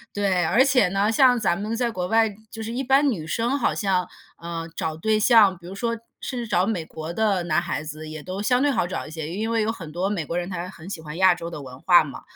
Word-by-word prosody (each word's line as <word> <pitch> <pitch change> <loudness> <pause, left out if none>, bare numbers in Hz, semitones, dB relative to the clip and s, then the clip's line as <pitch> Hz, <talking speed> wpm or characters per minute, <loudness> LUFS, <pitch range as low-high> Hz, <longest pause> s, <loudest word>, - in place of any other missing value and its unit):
对， 190 -4 +1
而 250 +10 +4
且 260 -7 +4
呢， 195 +3 +1
像 250 +1 +5
咱 175 -4 0
们 215 +2 -2
在 235 0 0
国 180 -3 -3
外 225 0 +3 0.2
就 225 0 -7
是 225 - -5
一 250 +3 -2
般 275 +2 +3
女 160 -8 -5
生 240 - 0
好 240 - +1
像， 185 -3 0 0.3
呃， 170 -1 -5
找 160 -1 -3
对 215 +6 +1
象， 210 -5 +5
比 170 0 -13
如 190 - -8
说 230 +3 -1 0.3
甚 255 - -4
至 235 - -4
找 185 -3 +2
美 190 -7 -2
国 160 +1 -7
的 200 -1 +1
男 170 -1 +1
孩 170 -3 -3
子， 155 +1 -8
也 155 -1 -8
都 185 +2 -5
相 250 +4 +2
对 290 0 +3
好 230 -9 0
找 185 - -4
一 - - -10
些， 155 -1 -5
因 215 +7 -3
为 230 - +2
有 215 - 0
很 165 -9 -6
多 180 +4 -1
美 180 -7 -2
国 170 +4 -3
人 175 +1 -3
他 180 0 -5
很 180 -1 -11
喜 170 -5 -6
欢 155 +1 -8
亚 185 -2 +5
洲 170 -1 -6
的 150 - -7
文 130 -1 -11
化 175 -2 +6
嘛。 140 - -9
190 Hz, 290 characters per minute, -24 LUFS, 170-225 Hz, 0.3 s, 化